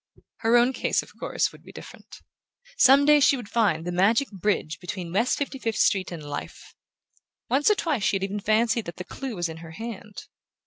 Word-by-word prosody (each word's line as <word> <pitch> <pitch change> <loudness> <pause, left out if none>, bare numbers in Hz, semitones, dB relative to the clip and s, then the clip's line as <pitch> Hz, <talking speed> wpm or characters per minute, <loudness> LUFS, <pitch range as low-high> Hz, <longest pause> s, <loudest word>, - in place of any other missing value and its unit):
Her 230 +1 +3
own 245 +2 +3
case, - - 0
of - - -17
course, - - -1
would - - -16
be - - -14
different. - - -13 0.5
Some 275 +1 +6
day 300 0 +6
she 280 0 +4
would 240 -5 -8
find 195 -9 +1
the 175 - -3
magic 220 +10 +2
bridge 190 -6 -2
between 180 -1 -6
West 230 +6 +1
Fifty 280 -1 -4
fifth 225 -4 -2
Street 190 -2 +2
and 165 -3 -7
life; 145 0 -8 0.8
once 280 +7 +3
or 425 - +4
twice 305 - -1
she 195 - +1
had 195 - -2
even 200 +1 -3
fancied 220 +2 +1
that 170 - -7
the 180 - -6
clue 260 +6 -7
was 175 -2 -1
in 160 0 -8
her 165 0 -11
hand. 215 0 -8
210 Hz, 210 wpm, -25 LUFS, 180-250 Hz, 0.8 s, Some